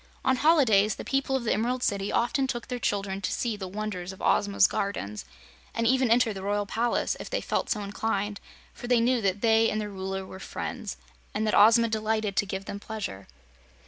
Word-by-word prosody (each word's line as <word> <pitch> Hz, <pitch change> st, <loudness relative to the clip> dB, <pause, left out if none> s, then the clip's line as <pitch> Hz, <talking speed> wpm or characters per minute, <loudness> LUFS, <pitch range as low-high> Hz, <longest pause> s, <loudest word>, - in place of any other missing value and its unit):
On 260 Hz, -1 st, +3 dB
holidays 235 Hz, -10 st, +4 dB
the -, -, -8 dB
people 270 Hz, 0 st, 0 dB
of 265 Hz, -, -1 dB
the 225 Hz, -, +1 dB
Emerald 245 Hz, +4 st, -1 dB
City 200 Hz, 0 st, 0 dB
often 265 Hz, +3 st, +1 dB
took 240 Hz, -2 st, -4 dB
their 250 Hz, -1 st, -3 dB
children 195 Hz, -3 st, -1 dB
to 185 Hz, -, -2 dB
see 235 Hz, -3 st, -1 dB
the 195 Hz, -2 st, -6 dB
wonders 190 Hz, -2 st, -4 dB
of 190 Hz, -, -12 dB
Ozma's 200 Hz, -1 st, +3 dB
gardens, 105 Hz, -, -2 dB, 0.5 s
and 230 Hz, -, 0 dB
even 255 Hz, +1 st, +3 dB
entered 230 Hz, -1 st, +4 dB
the 190 Hz, -, -7 dB
Royal 205 Hz, +1 st, -1 dB
Palace, 230 Hz, +4 st, 0 dB
if -, -, -7 dB
they -, -, -1 dB
felt -, -, -2 dB
so 210 Hz, -, 0 dB
inclined, 205 Hz, 0 st, -2 dB, 0.3 s
for 245 Hz, -, -8 dB
they 245 Hz, -1 st, +4 dB
knew 240 Hz, +1 st, +2 dB
that 195 Hz, 0 st, 0 dB
they 225 Hz, 0 st, +4 dB
and 215 Hz, -, -1 dB
their 210 Hz, -1 st, -4 dB
Ruler 190 Hz, 0 st, -4 dB
were 190 Hz, -, -10 dB
friends, -, -, -5 dB, 0.4 s
and 215 Hz, +1 st, 0 dB
that 215 Hz, -, 0 dB
Ozma 230 Hz, +2 st, +6 dB
delighted 215 Hz, -2 st, -1 dB
to 205 Hz, -, +2 dB
give 195 Hz, 0 st, -4 dB
them 200 Hz, -, -6 dB
pleasure. 205 Hz, -, -6 dB
215 Hz, 210 wpm, -27 LUFS, 200-235 Hz, 0.5 s, Ozma